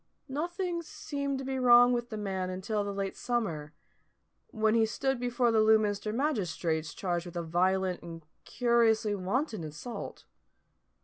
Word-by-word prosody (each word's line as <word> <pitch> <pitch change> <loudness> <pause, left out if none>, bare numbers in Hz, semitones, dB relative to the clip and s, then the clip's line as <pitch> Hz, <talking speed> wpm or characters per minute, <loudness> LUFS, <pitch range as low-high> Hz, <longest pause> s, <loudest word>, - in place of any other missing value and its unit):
Nothing 345 +5 -2
seemed 285 -3 -4
to 265 - -5
be 265 0 -2
wrong 245 0 +7
with 240 0 -2
the 215 - -5
man 190 -3 -2
until 205 +3 -2
the 200 - -3
late 195 -1 -3
summer, 170 -12 -2 0.8
when 220 -4 +1
he 230 -1 +4
stood 265 +4 -1
before 245 -1 +1
the 220 -1 +4
Lewminster 215 -1 +3
magistrates 175 - -1
charged 175 -2 -2
with 175 0 -7
a 170 - -2
violent 185 +2 +1
and 165 -2 -9 0.2
curiously 230 -3 +2
wanton 205 - -2
assault. 155 +10 -7
220 Hz, 145 wpm, -30 LUFS, 185-245 Hz, 0.8 s, wrong